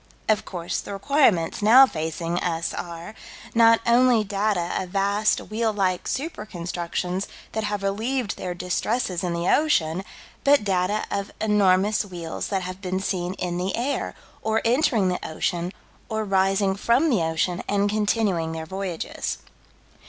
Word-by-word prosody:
Of 215 -2 +2
course 175 -2 -3
the 200 - -7
requirements 200 - +2
now 240 +6 +8
facing 165 -3 -3
us 165 -1 -1
are: 170 +3 -6 0.4
Not 230 0 +6
only 240 -1 +5
data 200 -3 0
of 185 - -5
vast 200 +3 +2
wheel 220 +1 -1
like 190 -3 0
super 285 -5 -3
constructions 180 0 -3 0.2
that 220 -1 -2
have 205 -1 -2
relieved 220 +4 -1
their 180 -1 -5
distresses 180 +2 -1
in 180 - -1
the 170 +1 -2
ocean, 185 - +2 0.4
but 280 -3 +5
data 195 +1 0
of 200 0 -2
enormous 205 -1 +3
wheels 175 -5 -5
that 195 -2 -1
have 185 +1 -6
been 185 -1 -2
seen 185 -1 -2
in 175 -2 -3
the 185 +2 -1
air, 260 +5 -2 0.3
or 220 0 +1
entering 230 -5 +3
the 180 - -1
ocean, 170 +2 -2 0.4
or 220 0 -1
rising 195 0 +2
from 245 +10 +2
the 215 -8 +2
ocean 160 +2 0
and 200 0 +2
continuing 205 -6 0
their 160 0 -5
voyages. 190 -1 -4
195 Hz, 150 wpm, -24 LUFS, 180-220 Hz, 0.4 s, now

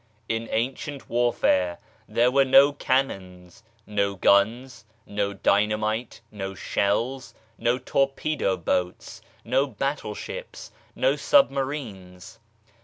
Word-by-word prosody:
In 115 0 -2
ancient 135 +4 -3
warfare 105 -7 +1 0.3
there 120 +1 +3
were 135 +1 +4
no 135 +2 +6
cannons, 95 -9 -2 0.2
no 100 -1 -1
guns, 115 +6 +2 0.2
no 100 0 -2
dynamite, 105 +4 0
no 95 -2 -6
shells, 120 +9 -1 0.2
no 120 +1 +1
torpedo 135 -6 0
boats, 90 +6 -3 0.2
no 130 +4 +2
battleships, 135 - -5 0.2
no - - +2
submarines. 130 - 0
115 Hz, 95 wpm, -25 LUFS, 100-135 Hz, 0.3 s, no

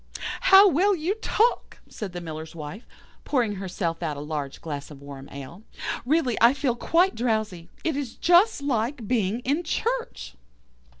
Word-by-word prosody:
"'How 390 +1 +9
well 390 +4 +3
you 340 +3 -1
talk!' 465 +3 +1
said 210 -4 -6
the 175 0 -6
Miller's 160 -1 -7
Wife, 165 - -8 0.4
pouring 235 -8 0
herself 180 -3 -3
out 155 -4 -2
a - - -5
large 145 -2 -4
glass 145 -3 -6
of 145 -3 -11
warm 140 -1 -10
ale; 140 +7 -9 0.5
'really 280 -5 +2
I 235 +4 +6
feel 265 -4 0
quite 355 +9 +2
drowsy. 215 -8 -2
It 320 -3 0
is 275 -5 -4
just 355 -1 +4
like 240 -2 -1
being 220 -1 0
in 285 +7 0
church. 465 +8 -3
225 Hz, 160 wpm, -25 LUFS, -, 0.5 s, How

